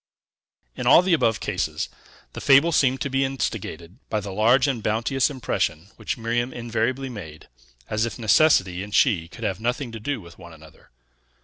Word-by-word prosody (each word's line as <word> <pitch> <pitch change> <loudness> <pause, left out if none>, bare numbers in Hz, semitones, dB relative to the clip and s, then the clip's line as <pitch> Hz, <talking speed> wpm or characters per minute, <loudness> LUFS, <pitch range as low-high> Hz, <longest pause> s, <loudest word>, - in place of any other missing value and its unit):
In - - -4
all 175 - +7
the 185 -1 +2
above 115 -10 +2
cases, - - -2 0.5
the - - -7
fable 140 +5 +5
seemed 130 -4 +2
to 140 - -1
be 135 +1 +1
instigated 110 -8 -4
by 110 - 0
the 100 -1 -7
large 120 +6 +4
and 130 -5 -1
bounteous 115 +6 0
impression 95 - -2
which - - -4
Miriam 120 +2 -1
invariably 120 +3 -2
made, 85 -11 -9 0.4
as 110 0 -1
if 115 -2 -3
necessity 105 - +3
and 100 +1 -5
she 90 -11 +3
could 115 +6 -11
have 95 -4 -2
nothing 120 +2 -2
to 115 - -7
do 135 +3 -3
with 85 -4 -14
one 85 -1 -12
another. 80 -1 -17
115 Hz, 180 wpm, -24 LUFS, 100-130 Hz, 0.5 s, all